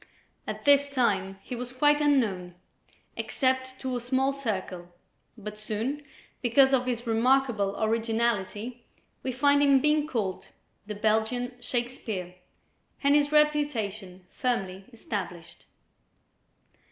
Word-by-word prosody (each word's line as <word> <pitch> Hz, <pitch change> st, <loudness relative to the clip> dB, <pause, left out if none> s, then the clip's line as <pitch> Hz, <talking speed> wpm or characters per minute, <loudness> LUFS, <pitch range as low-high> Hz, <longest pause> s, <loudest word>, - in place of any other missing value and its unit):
At -, -, -5 dB
this 285 Hz, 0 st, +5 dB
time 195 Hz, -8 st, 0 dB
he 250 Hz, -, -6 dB
was 245 Hz, +1 st, -6 dB
quite 295 Hz, +3 st, +3 dB
unknown, 210 Hz, -12 st, +1 dB, 0.6 s
except 260 Hz, -1 st, -1 dB
to 260 Hz, -1 st, -2 dB
a 245 Hz, -, -2 dB
small 260 Hz, +3 st, +1 dB
circle, 190 Hz, -9 st, -4 dB, 0.5 s
but 210 Hz, 0 st, -8 dB
soon, 225 Hz, +7 st, -3 dB, 0.4 s
because 265 Hz, +2 st, +4 dB
of 255 Hz, -1 st, +2 dB
his 240 Hz, -1 st, -2 dB
remarkable 230 Hz, -3 st, +2 dB
originality, 225 Hz, +1 st, -1 dB, 0.4 s
we 260 Hz, -, -2 dB
find 285 Hz, +3 st, +3 dB
him 280 Hz, -2 st, +5 dB
being 300 Hz, +1 st, +2 dB
called 215 Hz, -10 st, -3 dB, 0.4 s
"The 210 Hz, -, -4 dB
Belgian 220 Hz, +4 st, 0 dB
Shakespeare," 235 Hz, -7 st, -3 dB, 0.7 s
and 280 Hz, 0 st, +5 dB
his 290 Hz, 0 st, +3 dB
reputation 225 Hz, -12 st, 0 dB
firmly 195 Hz, -6 st, -2 dB
established. 180 Hz, -7 st, -6 dB
240 Hz, 115 wpm, -27 LUFS, 210-270 Hz, 0.7 s, this